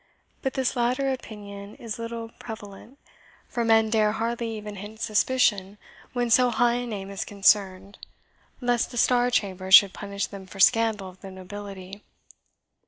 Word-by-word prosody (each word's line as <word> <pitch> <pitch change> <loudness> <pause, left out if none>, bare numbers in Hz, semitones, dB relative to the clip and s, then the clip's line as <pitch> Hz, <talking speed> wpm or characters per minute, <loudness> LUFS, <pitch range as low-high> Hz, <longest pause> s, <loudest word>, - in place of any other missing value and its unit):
But 265 - -2
this 265 -1 0
latter 255 +3 +1
opinion 205 -5 -8
is 230 -1 -7
little 230 0 -6
prevalent; 220 +3 -10 0.5
for 240 - -2
men 225 -1 +3
dare 215 -2 +3
hardly 230 0 -3
even 210 -1 -8
hint 210 +3 -9
suspicion 210 -3 +1 0.4
when 245 -2 -1
so 250 +2 +5
high 240 +1 +2
a 245 0 -4
name 200 -3 -6
is 195 - -3
concerned, 195 -1 +1 0.6
lest 245 -1 +1
the 240 - -8
Star 245 +1 +3
Chamber 190 -5 -1
should 195 0 +8
punish 200 0 -4
them 195 -2 -10
for 195 - -12
scandal 220 -2 +3
of 185 0 -14
the 195 - -9
nobility." 195 +1 -9
215 Hz, 155 wpm, -25 LUFS, 200-235 Hz, 0.6 s, should